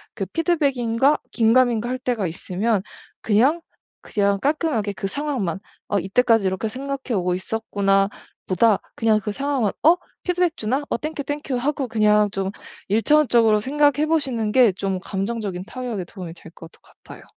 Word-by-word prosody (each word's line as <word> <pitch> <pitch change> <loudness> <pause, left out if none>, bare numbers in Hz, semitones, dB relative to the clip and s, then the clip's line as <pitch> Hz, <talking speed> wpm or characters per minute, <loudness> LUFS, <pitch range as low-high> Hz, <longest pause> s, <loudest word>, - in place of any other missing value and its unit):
그 - - -3
'피드백인가?' 280 -5 +1
긴가민가 235 0 +3
할 255 - -1
때가 245 -7 -1
있으면 190 +5 -1 0.4
그냥, 260 +11 +3 0.4
그냥 200 -1 0
깔끔하게 280 -8 0
그 195 - -4
상황만 250 - -2 0.3
'어 205 - 0
이때까지 225 +3 +2
이렇게 190 +3 -1
생각해 265 +2 -5
오고 180 0 0
있었구나.' 195 -1 0 0.4
보다 205 +3 +3 0.2
그냥 220 -2 +3
그 210 - -2
상황만 270 -4 0
'어 325 +3 +7 0.3
피드백 360 -2 +1
주나? 255 +7 -1
어 - - 0
땡큐, 305 0 -4
땡큐.' 290 -2 -3
하고 270 +1 -1
그냥 210 -2 +3
좀 195 -1 -2 0.4
1 215 +3 +2
차원적으로 235 -5 +4
생각해 290 +3 +2
보시는 260 -9 0
게 235 -5 +5
좀 190 0 -2
감정적인 195 -1 -4
타격에 240 -4 -5
도움이 175 -2 -9
될 165 -1 -14
것도 165 -1 -14
같아요. - - -15
230 Hz, 340 characters per minute, -22 LUFS, 200-275 Hz, 0.4 s, 어